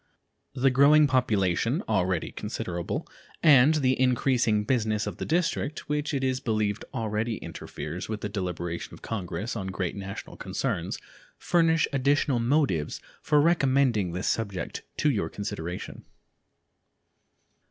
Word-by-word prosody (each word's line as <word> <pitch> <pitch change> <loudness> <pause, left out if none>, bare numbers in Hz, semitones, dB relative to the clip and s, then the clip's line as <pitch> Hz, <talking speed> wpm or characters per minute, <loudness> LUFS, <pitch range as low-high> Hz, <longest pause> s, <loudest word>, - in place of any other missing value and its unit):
The 135 0 +3
growing 145 +4 +6
population, 115 - +1
already 95 -5 0
considerable, 85 -1 -4 0.4
and 150 -1 +7
the 130 -4 +2
increasing 125 -4 +2
business 110 -2 0
of - - -5
the - - -4
District, 165 -2 -1
which 150 0 -1
it 135 -3 -1
is 130 -1 +1
believed 110 -4 -1
already 110 -2 -2
interferes 80 +1 -7
with 110 -1 -4
the - - -2
deliberations 90 -4 -4
of - - -13
Congress 100 +1 -4
on 95 -4 -4
great 90 -2 -3
national 100 0 -7
concerns, - - -2 0.4
furnish 165 -2 +3
additional 140 -1 +2
motives 115 - +1 0.2
for 150 -1 +3
recommending 135 - +3
this 90 +2 -3
subject 100 -5 -2 0.2
to 150 - +3
your 110 - -1
consideration. 90 -4 -5
115 Hz, 125 wpm, -27 LUFS, 95-140 Hz, 0.4 s, and